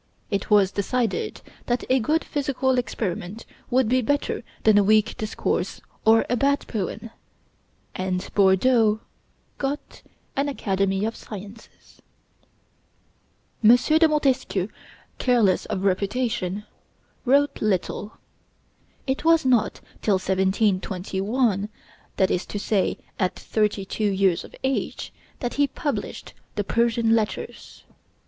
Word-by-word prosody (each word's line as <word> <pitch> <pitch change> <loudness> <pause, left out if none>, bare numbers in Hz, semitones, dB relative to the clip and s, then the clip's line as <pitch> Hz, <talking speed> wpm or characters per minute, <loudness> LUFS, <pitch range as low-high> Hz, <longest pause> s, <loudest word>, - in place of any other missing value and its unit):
It 200 - -1
was 200 -3 +5
decided 225 +2 -1 0.3
that 245 0 0
a 260 +1 +3
good 305 +8 +1
physical 265 -3 0
experiment 210 -2 -4 0.2
would 255 -1 +3
be 255 +3 +3
better 285 +1 -1 0.2
than 215 -2 +6
a - - +4
weak 215 +2 +3
discourse 215 0 -2 0.3
or 225 +1 +5
a 245 - +1
bad 280 +3 +1
poem; 220 +2 -4 0.8
and 185 -1 -2
Bordeaux 215 +3 +4 0.6
got 280 +2 -4 0.3
an 280 +1 0
Academy 195 -5 0
of 225 - -2
Sciences. 210 +1 -11 1.6
M. 225 +3 +9
de 315 +5 +4
Montesquieu, 265 - +1 0.5
careless 235 -7 +3
of 190 - -3
reputation, 200 0 0 0.6
wrote 280 +3 +2
little. 205 +1 -1 0.9
It 265 0 -1
was 330 -2 +4
not 245 -4 +2 0.2
till 205 - +3
1721, 190 +3 0 0.5
that 190 -1 +3
is 180 - -1
to - - -4
say, 200 -1 0 0.2
at 185 -1 +1
thirty 210 -2 0
two 210 +2 -1
years 190 -3 +2
of - - -13
age, 265 0 -2 0.3
that 245 -2 -2
he 285 0 +2
published 285 +1 -4 0.2
the 205 - 0
'Persian 230 +1 +2
Letters.' 215 -2 -4
220 Hz, 115 wpm, -24 LUFS, 195-255 Hz, 1.6 s, M